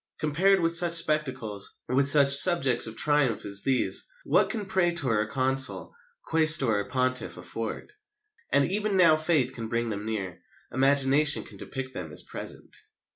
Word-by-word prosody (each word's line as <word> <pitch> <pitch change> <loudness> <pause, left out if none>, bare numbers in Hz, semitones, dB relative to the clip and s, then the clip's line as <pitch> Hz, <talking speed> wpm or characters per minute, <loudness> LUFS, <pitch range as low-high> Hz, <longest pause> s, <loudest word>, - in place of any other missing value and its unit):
Compared 180 +6 +1
with 165 0 +1
such 170 0 +4
spectacles, 130 -11 -3
with 135 +3 +3
such 140 -1 +6
subjects 140 -7 +4
of 110 - -9
triumph 145 -5 0
as 100 -1 -1
these, 130 +2 0 0.2
what - - +1
can 215 -4 -5
praetor 170 - 0
or 105 - -2
consul, 130 +3 -1 0.3
quaestor 155 -9 +2
or 100 - -4
pontiff, 130 -1 -2
afford? 115 - -7 0.6
And 140 - +2
even 205 +3 -2
now 170 -4 +5
faith 155 -5 0
can 115 -3 -7
bring 115 0 -3
them 105 0 -6
near, 100 -5 -6 0.3
imagination 140 +3 +3
can - - -15
depict 130 -1 -8
them 85 -8 -8
as - - -3
present." - - -10
135 Hz, 155 wpm, -25 LUFS, 115-160 Hz, 0.6 s, such